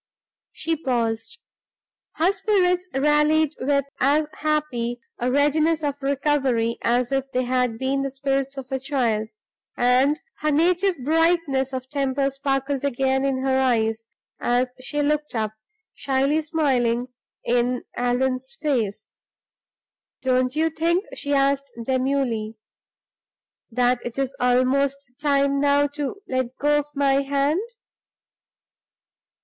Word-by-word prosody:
She 330 Hz, 0 st, -2 dB
paused; 240 Hz, -, -2 dB, 0.8 s
her 335 Hz, +4 st, +2 dB
spirits 375 Hz, -3 st, +1 dB
rallied 300 Hz, +2 st, +3 dB
with 280 Hz, +1 st, +1 dB
as 290 Hz, +4 st, +3 dB
happy 275 Hz, -6 st, -1 dB, 0.2 s
a 245 Hz, -, 0 dB
readiness 305 Hz, +3 st, +2 dB
of 290 Hz, -1 st, 0 dB
recovery 270 Hz, -4 st, +1 dB
as 245 Hz, +2 st, +1 dB
if 270 Hz, 0 st, -1 dB
they 255 Hz, -, 0 dB
had 250 Hz, -2 st, 0 dB
been 265 Hz, +2 st, 0 dB
the 275 Hz, -, -1 dB
spirits 275 Hz, 0 st, -2 dB
of 265 Hz, 0 st, -7 dB
a 265 Hz, -, -1 dB
child; 240 Hz, -6 st, 0 dB, 0.5 s
and 255 Hz, +5 st, +3 dB, 0.2 s
her 305 Hz, -, 0 dB
native 350 Hz, +5 st, +2 dB
brightness 320 Hz, -4 st, +2 dB
of 260 Hz, -1 st, -5 dB
temper 275 Hz, 0 st, 0 dB
sparkled 275 Hz, 0 st, -1 dB
again 265 Hz, 0 st, +1 dB
in 265 Hz, -1 st, 0 dB
her 265 Hz, 0 st, +2 dB
eyes, 225 Hz, -3 st, +1 dB, 0.3 s
as 250 Hz, +1 st, +1 dB
she 295 Hz, +3 st, -1 dB
looked 300 Hz, -1 st, -1 dB
up, 215 Hz, -1 st, -1 dB, 0.4 s
shyly 275 Hz, +3 st, +1 dB
smiling 255 Hz, -6 st, 0 dB, 0.3 s
in 245 Hz, +1 st, +1 dB
Allan's 255 Hz, +2 st, -1 dB
face. 230 Hz, -9 st, -2 dB, 1.1 s
"Don't 255 Hz, 0 st, +1 dB
you 320 Hz, +1 st, +1 dB
think," 340 Hz, +5 st, 0 dB
she 285 Hz, 0 st, -2 dB
asked, 275 Hz, 0 st, +1 dB
demurely, 255 Hz, -4 st, -1 dB, 1.1 s
"that 245 Hz, +1 st, +1 dB
it 240 Hz, +1 st, -6 dB
is 270 Hz, -1 st, -2 dB
almost 260 Hz, +2 st, +1 dB
time 280 Hz, -1 st, +2 dB
now 285 Hz, 0 st, +3 dB
to 295 Hz, +7 st, -5 dB
let 255 Hz, -1 st, -2 dB
go 295 Hz, +1 st, +3 dB
of 290 Hz, -, -3 dB
my 275 Hz, -1 st, +3 dB
hand?" 280 Hz, +5 st, +1 dB
275 Hz, 120 wpm, -23 LUFS, 250-295 Hz, 1.1 s, rallied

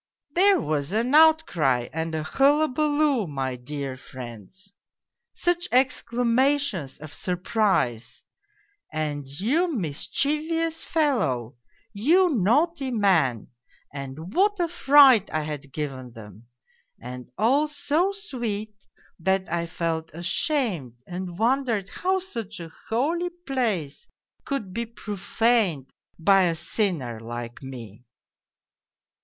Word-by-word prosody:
" -, -, -56 dB
There 380 Hz, +4 st, +5 dB
was 150 Hz, +2 st, -2 dB
an 235 Hz, +5 st, +1 dB
outcry 195 Hz, -, +4 dB
and 160 Hz, 0 st, -2 dB
a 155 Hz, -, -2 dB
hullabaloo, 290 Hz, -, +2 dB
my 135 Hz, -3 st, -3 dB
dear 135 Hz, +1 st, -5 dB
friends! 130 Hz, -, -11 dB, 0.6 s
Such 350 Hz, +1 st, 0 dB
exclamations 245 Hz, -, +1 dB
of 155 Hz, 0 st, -11 dB
surprise! 180 Hz, -, -1 dB, 0.7 s
And 150 Hz, -3 st, -3 dB
' -, -, -7 dB
you 315 Hz, -, +1 dB
mischievous 305 Hz, -, -1 dB
fellow, 180 Hz, -, 0 dB, 0.4 s
you 330 Hz, -, +4 dB
naughty 270 Hz, -, +2 dB
man,' 180 Hz, -, +2 dB, 0.4 s
and 145 Hz, +6 st, -7 dB
what 410 Hz, +2 st, +2 dB
a 345 Hz, -, +2 dB
fright 275 Hz, -, +6 dB
I 155 Hz, -, 0 dB
had 150 Hz, -2 st, -6 dB
given 130 Hz, -5 st, -5 dB
them 110 Hz, 0 st, -13 dB, 0.5 s
and 125 Hz, +1 st, -8 dB
all 270 Hz, +9 st, +3 dB
so 300 Hz, +5 st, 0 dB
sweet 235 Hz, -, -4 dB, 0.5 s
that 190 Hz, +2 st, +1 dB
I 170 Hz, 0 st, -1 dB
felt 165 Hz, -1 st, -3 dB
ashamed 175 Hz, -, -1 dB
and 180 Hz, -1 st, -6 dB
wondered 230 Hz, -3 st, +1 dB
how 375 Hz, +2 st, 0 dB
such 230 Hz, -, -6 dB
a 165 Hz, -1 st, -9 dB, 0.2 s
holy 320 Hz, +10 st, 0 dB, 0.2 s
place 215 Hz, -, -2 dB, 0.4 s
could 220 Hz, -10 st, -3 dB
be 235 Hz, +2 st, -3 dB
profaned 210 Hz, -, 0 dB, 0.3 s
by 195 Hz, +2 st, +4 dB
a 170 Hz, -2 st, +1 dB
sinner 165 Hz, -, -2 dB
like 120 Hz, +1 st, -7 dB
me. 120 Hz, -4 st, -9 dB
200 Hz, 110 wpm, -25 LUFS, -, 0.7 s, fright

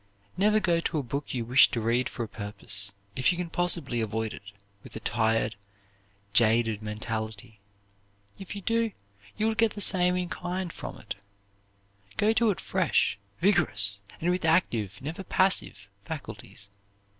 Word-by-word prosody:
Never 210 Hz, +4 st, +3 dB
go 175 Hz, -4 st, +2 dB
to 165 Hz, -1 st, -2 dB
a 145 Hz, -, -1 dB
book 140 Hz, +4 st, -4 dB
you 120 Hz, -3 st, -2 dB
wish 125 Hz, +3 st, +6 dB
to 120 Hz, -, -2 dB
read 120 Hz, +3 st, +1 dB
for 120 Hz, -, -4 dB
a -, -, -5 dB
purpose, 100 Hz, -1 st, -5 dB, 0.2 s
if 130 Hz, +6 st, +3 dB
you 175 Hz, -, -3 dB
can 175 Hz, -2 st, -4 dB
possibly 165 Hz, -9 st, +1 dB
avoid 110 Hz, 0 st, -2 dB
it, -, -, -9 dB, 0.4 s
with -, -, -12 dB
a -, -, -4 dB
tired, 110 Hz, -1 st, 0 dB, 0.8 s
jaded 115 Hz, -1 st, +3 dB
mentality. 110 Hz, 0 st, -5 dB, 0.8 s
If 195 Hz, +1 st, -7 dB
you 200 Hz, -, -7 dB
do, 230 Hz, 0 st, +1 dB, 0.4 s
you 215 Hz, -, +1 dB
will 225 Hz, -, +2 dB
get 220 Hz, 0 st, +2 dB
the 205 Hz, -, -7 dB
same 180 Hz, -2 st, +6 dB
in 180 Hz, -1 st, -1 dB
kind 180 Hz, 0 st, -4 dB
from -, -, -7 dB
it. 110 Hz, -, -6 dB, 1.0 s
Go 215 Hz, +2 st, +3 dB
to 225 Hz, 0 st, +3 dB
it 200 Hz, -, -1 dB
fresh, 95 Hz, -, +1 dB, 0.2 s
vigorous, 100 Hz, -, +2 dB, 0.2 s
and 175 Hz, +2 st, +1 dB
with 180 Hz, 0 st, -1 dB
active, 160 Hz, -, +1 dB
never 160 Hz, +7 st, -5 dB
passive, 185 Hz, -, +2 dB, 0.2 s
faculties. 105 Hz, -7 st, -8 dB
130 Hz, 160 wpm, -28 LUFS, 110-180 Hz, 1.0 s, wish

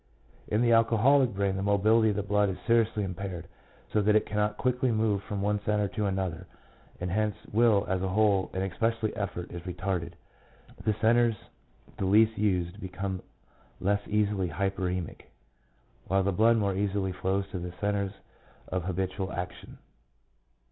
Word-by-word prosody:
In 110 Hz, +3 st, +1 dB
the 120 Hz, -, +3 dB
alcoholic 115 Hz, +4 st, +4 dB
brain 100 Hz, -1 st, 0 dB
the 95 Hz, -, -2 dB
mobility 110 Hz, +3 st, +3 dB
of 105 Hz, -, 0 dB
the 105 Hz, -, -1 dB
blood 105 Hz, 0 st, +2 dB
is 95 Hz, -, -4 dB
seriously 115 Hz, -2 st, +2 dB
impaired, 90 Hz, -2 st, -5 dB, 0.5 s
so 105 Hz, -, +3 dB
that 105 Hz, +1 st, +3 dB
it 110 Hz, -, +3 dB
cannot 105 Hz, 0 st, -1 dB
quickly 125 Hz, 0 st, +1 dB
move 110 Hz, -3 st, +1 dB
from 100 Hz, -1 st, -4 dB
one 105 Hz, 0 st, 0 dB
centre 105 Hz, -1 st, +1 dB
to 105 Hz, 0 st, -2 dB
another, 95 Hz, -2 st, -3 dB, 0.5 s
and 90 Hz, 0 st, -3 dB
hence 105 Hz, +1 st, 0 dB, 0.2 s
will 110 Hz, -2 st, +4 dB
as 95 Hz, -1 st, 0 dB
a 95 Hz, -, 0 dB
whole, 100 Hz, 0 st, +2 dB
and 95 Hz, -, -2 dB
especially 110 Hz, +4 st, -1 dB
effort, 95 Hz, -4 st, -4 dB
is 85 Hz, -, -6 dB
retarded; 90 Hz, -1 st, -3 dB, 0.7 s
the 110 Hz, -, +1 dB
centres 115 Hz, 0 st, +4 dB, 0.6 s
the 95 Hz, -, 0 dB
least 110 Hz, +3 st, +4 dB
used 95 Hz, -1 st, -1 dB
become 95 Hz, 0 st, -4 dB, 0.6 s
less 100 Hz, +2 st, +1 dB
easily 105 Hz, -3 st, +1 dB
hyperemic, 90 Hz, -3 st, -3 dB, 0.8 s
while 95 Hz, 0 st, +2 dB
the 100 Hz, -, +1 dB
blood 115 Hz, +5 st, +4 dB
more 100 Hz, -3 st, +1 dB
easily 100 Hz, -1 st, -1 dB
flows 95 Hz, +2 st, -1 dB
to 90 Hz, -, -4 dB
the 90 Hz, 0 st, -5 dB
centres 100 Hz, -1 st, -1 dB, 0.6 s
of 90 Hz, -1 st, -2 dB
habitual 95 Hz, +1 st, -2 dB
action. 90 Hz, 0 st, -6 dB
100 Hz, 160 wpm, -28 LUFS, 95-110 Hz, 0.8 s, alcoholic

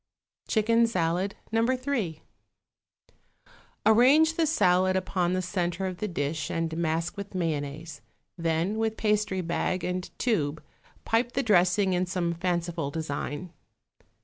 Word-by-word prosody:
=Chicken 230 Hz, +1 st, +3 dB
Salad, 180 Hz, -1 st, 0 dB, 0.2 s
No. 225 Hz, 0 st, +2 dB
3.= 250 Hz, -, -1 dB, 1.6 s
Arrange 270 Hz, +9 st, +6 dB
the 325 Hz, -1 st, +1 dB
salad 185 Hz, -, +3 dB
upon 185 Hz, -1 st, 0 dB
the 185 Hz, 0 st, 0 dB
centre 180 Hz, 0 st, -2 dB
of 185 Hz, -1 st, -4 dB
the 215 Hz, -, -2 dB
dish 155 Hz, -3 st, -2 dB
and 165 Hz, -1 st, -2 dB
mask 165 Hz, +1 st, -1 dB
with 200 Hz, -1 st, -7 dB
mayonnaise; 155 Hz, -2 st, -3 dB, 0.3 s
then 170 Hz, +4 st, -1 dB
with 220 Hz, -1 st, -1 dB
pastry 210 Hz, -3 st, +1 dB
bag 175 Hz, +2 st, -1 dB
and 180 Hz, 0 st, -3 dB
tube 160 Hz, -, 0 dB, 0.4 s
pipe 235 Hz, +2 st, +1 dB
the 275 Hz, -, 0 dB
dressing 190 Hz, -1 st, +3 dB
in 180 Hz, 0 st, 0 dB
some 175 Hz, -2 st, -1 dB
fanciful 170 Hz, -3 st, -2 dB
design. 155 Hz, +2 st, -4 dB
185 Hz, 125 wpm, -27 LUFS, 165-215 Hz, 1.6 s, Arrange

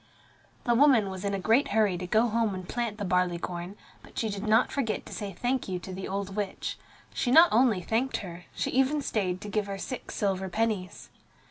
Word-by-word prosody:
The 240 Hz, -, +2 dB
woman 235 Hz, -6 st, +5 dB
was 190 Hz, 0 st, -6 dB
in 200 Hz, 0 st, 0 dB
a -, -, -2 dB
great 225 Hz, +8 st, +3 dB
hurry 210 Hz, -3 st, +2 dB
to 180 Hz, +1 st, -5 dB
go 220 Hz, +5 st, +3 dB
home 225 Hz, -3 st, 0 dB
and 185 Hz, -1 st, -7 dB
plant 235 Hz, -3 st, -2 dB
the 205 Hz, -, -3 dB
barley 180 Hz, -1 st, +1 dB
corn, 175 Hz, +2 st, -5 dB, 0.3 s
but -, -, -17 dB
she 220 Hz, -, 0 dB
did 200 Hz, +1 st, -4 dB
not 220 Hz, +3 st, +4 dB
forget 240 Hz, -6 st, -2 dB
to -, -, -9 dB
say 205 Hz, -1 st, -4 dB
"thank 245 Hz, +7 st, -1 dB
you" 185 Hz, -, -1 dB
to 185 Hz, +1 st, -8 dB
the 190 Hz, +1 st, -5 dB
old 195 Hz, 0 st, -3 dB
witch. 205 Hz, -2 st, -3 dB, 0.3 s
She 245 Hz, -, -1 dB
not 325 Hz, +7 st, +8 dB
only 225 Hz, -4 st, +4 dB
thanked 235 Hz, +8 st, 0 dB
her, 175 Hz, -1 st, -9 dB
she -, -, -1 dB
even 270 Hz, +3 st, +2 dB
stayed 185 Hz, -6 st, -1 dB
to 210 Hz, -, -7 dB
give 205 Hz, 0 st, -1 dB
her 195 Hz, 0 st, -4 dB
six 255 Hz, +5 st, -6 dB
silver 190 Hz, -2 st, -1 dB
pennies. 205 Hz, -3 st, -2 dB
205 Hz, 220 wpm, -28 LUFS, 185-230 Hz, 0.3 s, not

